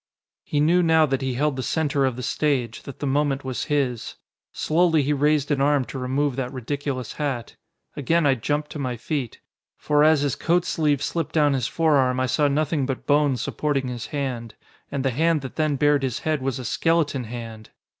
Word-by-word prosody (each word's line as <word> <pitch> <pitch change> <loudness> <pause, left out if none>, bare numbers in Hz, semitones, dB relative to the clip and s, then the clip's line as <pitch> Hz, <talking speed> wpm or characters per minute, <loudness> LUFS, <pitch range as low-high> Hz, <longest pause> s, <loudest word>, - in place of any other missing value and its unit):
He 145 - -1
knew 170 +5 +4
now 160 -2 +4
that 135 -2 -1
he 130 -2 -2
held 145 +1 0
the - - -1
center 145 -1 0
of 130 -2 -1
the 125 - -6
stage, 130 -5 -1
that 140 - -8
the - - -4
moment 140 0 0
was 130 -2 -3
his. 135 -6 -1 0.4
Slowly 160 -1 +2
he 145 +2 +1
raised 150 +1 +1
an 140 -2 +1
arm 140 -2 +3
to 135 - -7
remove 135 +2 0
that 125 -2 -2
ridiculous 130 -1 -4
hat. 135 -6 -3 0.4
Again 165 +4 +1
I 140 - +5
jumped 145 +5 -2
to 150 - -6
my 125 -3 -3
feet. 125 0 -4 0.4
For 150 0 +2
as 155 -1 +5
his 145 -3 0
coat 175 +1 +1
sleeve 150 -5 +1
slipped 165 -3 -2
down 150 -2 +4
his 130 -3 0
forearm 140 -6 +2
I 130 - +2
saw 145 +3 +2
nothing 145 -1 0
but 135 -2 -4
bone 145 -2 +3
supporting 135 +2 -1
his 120 -2 -5
hand. 125 -6 -4 0.4
And 140 -1 -2
the 135 - +2
hand 160 +4 +1
that 130 - -8
then 155 -2 +1
bared 145 +1 +3
his 130 -2 -2
head 155 -3 -1
was 135 0 -2
a 130 - -6
skeleton 150 -1 +1
hand! 115 -1 -8
140 Hz, 205 wpm, -24 LUFS, 130-150 Hz, 0.4 s, I